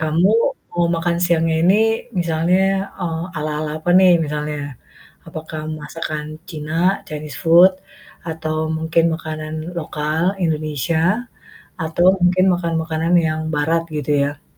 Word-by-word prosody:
Kamu 160 +4 +2 0.4
mau 175 0 +1
makan 170 +1 0
siangnya 165 -2 +2
ini 185 +3 +5 0.5
misalnya, 170 +2 +1 0.4
eee, 165 -2 -2
ala-ala 150 0 -2
apa 175 - -1
nih 185 -1 +6
misalnya. 150 0 -3 0.7
Apakah 155 -1 -7 0.2
masakan 150 0 -5 0.3
Cina, 155 -2 -6 0.3
Chinese 150 -2 -7
food 170 +3 +7 0.5
atau 160 -1 -3 0.2
mungkin 165 +1 +1
makanan 155 -1 -6 0.2
lokal 155 0 -2 0.2
Indonesia 160 - 0 0.5
atau 160 +2 +1 0.2
mungkin 180 +1 +4
makanan-makanan 165 -1 -1
yang 155 0 -1
Barat 160 +3 +1
gitu 150 0 -1
ya? 145 +2 -5
160 Hz, 115 wpm, -19 LUFS, 155-170 Hz, 0.7 s, food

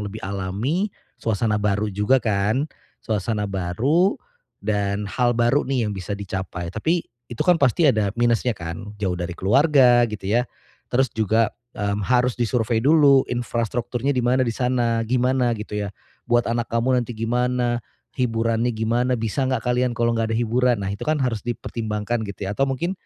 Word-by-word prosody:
lebih 105 +1 -6
alami, 100 - -1 0.3
suasana 105 -1 0
baru 105 0 0
juga 105 +7 +3
kan, 110 +5 +1 0.4
suasana 105 0 -1
baru 110 - +1 0.5
dan 100 -1 0
hal 120 +4 0
baru 120 +4 +3
nih 130 -4 +1
yang - - -3
bisa 100 +1 -4
dicapai, 95 -3 -5
tapi 165 - 0 0.3
itu 120 - -9
kan 180 -2 +4
pasti 145 +2 +3
ada 105 -6 +2
minusnya 120 +1 +2
kan 85 +2 -7
jauh 95 -3 0
dari 90 0 -4
keluarga 125 - +4
gitu 100 -2 -5
ya, 120 +4 +2 0.5
terus 130 +2 +3
juga, 110 0 +2 0.2
mmm, 105 -2 -2
harus 125 +1 +2
disurvei 115 -1 0
dulu 140 -3 +6
infrastrukturnya 120 +2 -1
di 125 - 0
mana 125 +2 +2
di 115 - -1
sana, 120 -1 0
gimana 125 0 +2
gitu 105 0 -8
ya, 100 - -2 0.4
buat 120 0 +3
anak 115 0 -1
kamu 125 +2 +2
nanti 120 0 -5
gimana, 120 +1 0 0.4
hiburannya 115 -1 0
gimana 120 +3 +1
bisa 115 +4 -1
nggak 130 -3 0
kalian 125 0 +1
kalau 120 0 +2
nggak 115 0 0
ada - - 0
hiburan, 120 +2 +2
nah - - -2
itu 100 - -7
kan 155 - +3
harus 120 -5 0
dipertimbangkan 115 -1 -3
gitu 100 0 -6
ya - - -2
atau 135 - +3
mungkin 150 +8 -1
115 Hz, 165 wpm, -23 LUFS, 105-125 Hz, 0.5 s, dulu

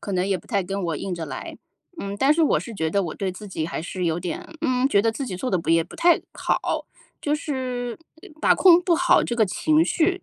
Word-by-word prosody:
可 200 - -5
能 185 0 +1
也 195 -1 +1
不 - - -19
太 200 -5 0
跟 195 +2 -4
我 165 -3 -1
硬 185 +4 -4
着 165 -2 -5
来。 - - -7 0.4
嗯， 200 -5 -4
但 270 +5 +5
是 325 +2 +2
我 305 - +3
是 235 - -8
觉 160 -4 -1
得 200 +4 +1
我 165 -4 -4
对 195 -2 -2
自 195 +3 -9
己 160 -5 -3
还 170 - -4
是 180 +2 -4
有 165 0 0
点 175 0 -5 0.2
嗯， 255 +1 +2
觉 200 - +4
得 225 0 +2
自 275 +3 -4
己 185 - -4
做 250 +8 -3
得 185 - +2
不 165 - -7
也 165 0 +4
不 - - -14
太 345 -1 +4
好， - - -1 0.3
就 295 - 0
是， 255 -5 -3 0.4
把 - - +5
控 355 -2 +6
不 350 -1 +3
好 350 +1 +4
这 235 - -2
个 225 - +4
情 310 - +2
绪， 355 +3 +1
210 Hz, 275 characters per minute, -24 LUFS, 180-290 Hz, 0.4 s, 控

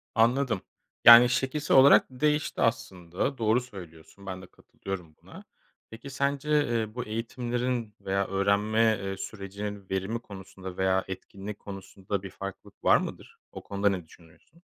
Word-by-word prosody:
Anladım. 120 -2 +2 0.4
Yani, 120 +1 +10
şekilsel 135 +4 +1
olarak 135 +2 +7
değişti 150 +3 -1
aslında, 105 +1 -1
doğru 115 +1 +2
söylüyorsun, 95 -5 -13
ben 95 -1 -6
de 90 - -12
katılıyorum 90 -4 -9
buna. - - -13 0.5
Peki 110 +5 -10
sence, 140 +2 -2 0.2
eee, 115 -2 -2
bu 125 - -3
eğitimlerin 120 +1 -3
veya 95 0 -1
öğrenme, 105 +3 +2
eee, 95 0 -4
sürecinin 100 0 -7
verimi 95 +5 -2
konusunda 95 -3 -10
veya 95 0 +1
etkinliği 95 +2 -7
konusunda 95 0 -6
bir 100 - -6
farklılık 100 +1 -9
var - - +6
mıdır? - - -7
O - - -9
konuda 100 0 0
ne 90 -4 -3
düşünüyorsun? 85 - -21
105 Hz, 140 wpm, -27 LUFS, 95-120 Hz, 0.5 s, Yani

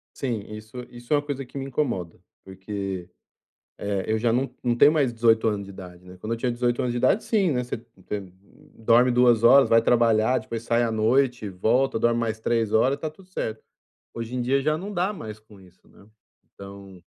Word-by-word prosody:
Sim, 120 -6 -3
isso 110 +3 -10
isso 120 +1 -13
é - - +6
uma 145 - -2
coisa 140 -2 -4
que 130 - -11
me 135 - -4
incomoda, 120 - -3 0.2
porque, 95 -1 -6 0.7
eh, 100 -2 -2
eu 110 0 0
já 115 +1 +1
não 130 +4 -1
não 120 -1 +1
tenho 145 +5 +6
mais 145 -5 +2
18 115 -1 +3
anos 105 -2 -2
de 100 - -11
idade, 90 -2 -11
né, 90 0 -13
quando 110 +4 -5
eu - - -5
tinha 120 +1 -1
18 120 0 0
anos 125 - -1
de 120 - -2
idade, 130 - +2
sim, 200 -6 +2
né, 125 -3 -1
você 120 - -5 0.3
tem 100 -3 -5 0.5
dorme 120 +3 +4
2 120 -2 +4
horas, 135 +3 +6
vai 115 0 +6
trabalhar, 115 0 +3
depois 115 0 -6
sai 115 +1 +1
à 115 -1 0
noite, 120 +1 +1
volta, 115 +7 +1
dorme 120 +1 +2
mais 110 -1 -2
3 115 -2 0
horas, 130 +5 +3
tá 155 - -3
tudo 180 +5 -17
certo. 110 -11 -4 0.5
Hoje 115 +1 -6
em 125 - -1
dia 135 +3 +1
já 155 +1 +1
não 195 +5 -6
dá 185 +3 0
mais 110 - -8
com 105 -2 -18
isso, 90 -1 -21
né, 100 - -20 0.5
então 100 -2 -12
115 Hz, 215 wpm, -24 LUFS, 105-125 Hz, 0.7 s, é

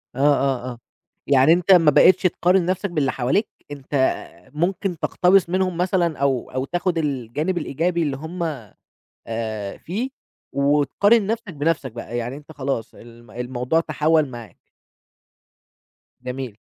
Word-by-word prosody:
آه، - - -6
آه، 135 -3 +2
آه، 120 - -10 0.5
يعني 140 +3 +5
أنت 180 +2 +2
ما 165 -5 +7
بقيتش 185 +5 +6
تقارن 180 0 +2
نَفْسك 185 +3 -1
باللي 150 -6 0
حواليك، 135 - 0 0.2
أنت 140 -2 -10 0.6
ممكن 175 +3 -1
تقتبس 180 -1 +3
منهم 185 -1 0
مثلًا 175 -3 +1
أو 135 -3 0
أو 130 +1 -2
تاخد 175 +3 -1
الجانب 145 +3 -2
الإيجابي 170 +2 -1
اللي 140 -3 -2
هُم 170 +4 -5 0.8
آآ، 110 -3 -4
فيه 220 +10 -4 0.4
وتقارن 150 - +3
نَفْسك 225 -3 -3
بنَفْسك 145 -3 -1
بقى، 120 +1 -6
يعني 120 +2 -3
أنت 150 +1 -13
خلاص 135 -6 -3
الم 120 -1 -15
الموضوع 125 +5 -1
تحوّل 155 -1 +1
معاك. 120 -3 -10 1.7
جميل. 125 -3 -5
150 Hz, 135 wpm, -22 LUFS, 130-175 Hz, 1.7 s, ما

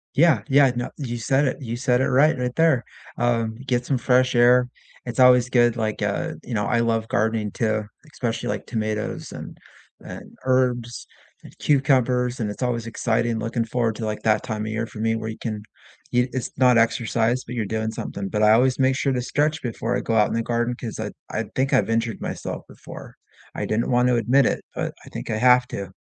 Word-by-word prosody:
Yeah, 150 -5 +4
yeah, 135 -1 +5
no, 120 0 -3
you 120 -5 -4
said 135 +5 +1
it, 130 - -2
you 120 -2 -4
said 125 0 +1
it - - +2
right, 140 +4 +4
right 125 0 -2
there. 160 -7 +3 0.3
Um, 115 -2 0
get 125 -2 0
some 135 - 0
fresh 125 +1 +2
air, 125 +1 +5 0.4
it's 120 +1 -5
always 125 -1 +6
good, 120 -1 +3
like, 110 -2 -2
uh, - - -1
you 125 - -7
know, 105 -2 0
I 120 - +1
love 115 -1 0
gardening 110 -1 0
too, 110 -1 -1 0.3
especially, 115 -5 -3
like, 105 0 -3
tomatoes 110 -2 -3
and - - -9 0.5
and - - -10
herbs 125 -2 0 0.4
and - - -15
cucumbers, 130 -3 +2
and 105 - -1
it's 105 - -10
always 115 -2 -1
exciting 115 0 -1
looking 115 +1 -1
forward 115 -1 -1
to, 110 - -4
like, 105 0 -4
that 110 -1 +2
time 110 -1 -4
of 110 - -4
year 110 +1 -2
for 110 - -11
me 115 +1 +1
where 110 0 -4
you 110 - -7
can 110 -3 -5 0.5
eat 125 +1 +2
it's 130 - -3
not 125 -2 +5
exercise, 115 +1 +1
but - - -7
you're 115 -3 -1
doing 110 +2 -2
something, 100 -2 -5
but 105 +2 -1
I 105 - +6
always 125 +4 +3
make 130 0 +3
sure 140 -2 0
to 125 - -1
stretch 150 +5 0
before 120 0 -2
I - - -1
go 115 - -1
out 105 -1 +4
in - - -4
the 115 - 0
garden 120 +1 -1
'cause 115 -3 -7
I 110 -1 -3 0.2
I 115 - -2
think 135 +1 0
I've - - +3
injured 115 0 -1
myself - - -5
before. - - -12 0.4
I - - -2
didn't 110 +2 -1
want 125 0 +3
to 125 - +3
admit 125 +4 +3
it, - - -1
but - - -3
I - - -12
think - - -7
I 110 - -1
have 125 +1 +5
to. 100 -1 -6
120 Hz, 220 wpm, -23 LUFS, 110-125 Hz, 0.5 s, always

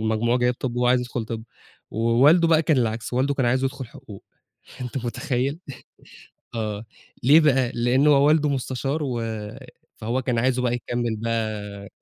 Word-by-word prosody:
المجموع 110 +2 +1
جايب 125 0 +1
طِب 120 -1 -4
وهو 125 0 +1
عايز 125 0 +4
يدخل 120 -2 -4
طِب، 110 0 -6 0.5
ووالده 130 +10 +4
بقى 160 -1 +4
كان 155 -2 +2
العكس، 115 0 -2
والده 135 +3 +1
كان 130 -3 0
عايزه 130 +2 +1
يدخل 135 -1 -3
حقوق، 115 -6 -13 0.6
أنت 125 0 -5
متخيّل! 130 +4 -2 1.0
آه، 110 -1 -3 0.4
ليه 145 +6 +7
بقى 135 -5 +2
لأن 125 +4 +2
هو 140 -2 +5
والده 150 -1 +3
مستشار، 135 +2 -2
و 125 -4 -2 0.8
فهو 120 +4 -2
كان 120 -2 -1
عايزُه 125 +1 +1
بقى 120 -1 +1
يكمّل 120 -2 -2
بقى 105 -3 -4
125 Hz, 160 wpm, -23 LUFS, 115-135 Hz, 1.0 s, ليه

